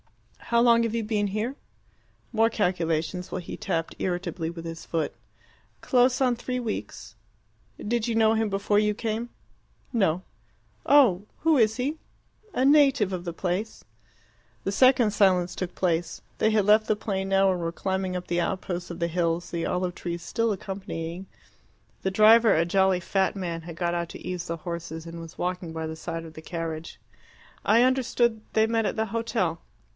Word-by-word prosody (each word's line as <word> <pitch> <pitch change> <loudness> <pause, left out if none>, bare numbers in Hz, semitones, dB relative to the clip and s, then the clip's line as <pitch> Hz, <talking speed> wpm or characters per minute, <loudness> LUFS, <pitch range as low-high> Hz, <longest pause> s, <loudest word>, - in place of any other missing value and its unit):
"How 235 - +2
long 235 -1 +5
have 230 0 -1
you 230 - 0
been 210 -1 0
here?" 215 +7 -2 0.8
More 225 0 +4
calculations, 180 -3 -1
while 185 - -2
he 175 - -7
tapped 165 0 -2
irritably 175 -2 -2
with 170 0 -8
his 165 0 -6
foot. 160 -2 -2 0.7
"Close 250 0 +3
on 255 -2 +3
three 250 +1 -3
weeks." 230 -3 -5 0.6
"Did 235 +1 -1
you 230 - -1
know 220 -1 +4
him 220 -1 +1
before 200 +1 +1
you 210 0 +2
came?" 225 +2 -3 0.6
"No." 185 -6 +1 0.6
"Oh! 215 -9 +5
Who 320 0 +4
is 220 -2 +3
he?" 285 +5 -2 0.5
"A 255 - +1
native 275 -8 +4
of 180 -1 -3
the 175 - -4
place." 185 +5 -3 0.8
The 195 - -1
second 250 -1 +5
silence 185 -3 +3
took 185 -1 -4
place. 175 -2 -1 0.2
They 220 - +3
had 215 -2 +2
left 215 +1 +5
the 215 - +1
plain 195 -3 -3
now 195 0 +4
and 180 -1 -2
were 165 0 -2
climbing 190 +1 -2
up 180 - -7
the 175 0 0
outposts 180 -1 -3
of 170 0 -7
the 170 - +1
hills, 170 0 -1
the 170 -1 -2
olive 180 0 -1
trees 170 -1 -5
still 230 +3 0
accompanying. 190 -2 -5 0.7
The 190 - -1
driver, 220 +2 +6
a 165 +1 +3
jolly 190 +1 +3
fat 190 +3 0
man, 170 -3 -3
had 165 0 -9
got 175 -1 0
out 170 -1 -2
to - - -9
ease 180 -1 -4
the 170 - -3
horses, 165 -1 -6
and 165 0 -8
was 165 0 -11
walking 180 -1 -3
by 160 0 -4
the 160 - -5
side 165 0 -5
of 160 - -11
the 160 - -10
carriage. 165 -1 -5 0.6
"I 230 +2 +5
understood 245 -3 +2
they 220 0 +4
met 225 -1 +1
at - - -2
the 220 - 0
hotel." 220 -7 -1
190 Hz, 180 wpm, -26 LUFS, 170-225 Hz, 0.8 s, driver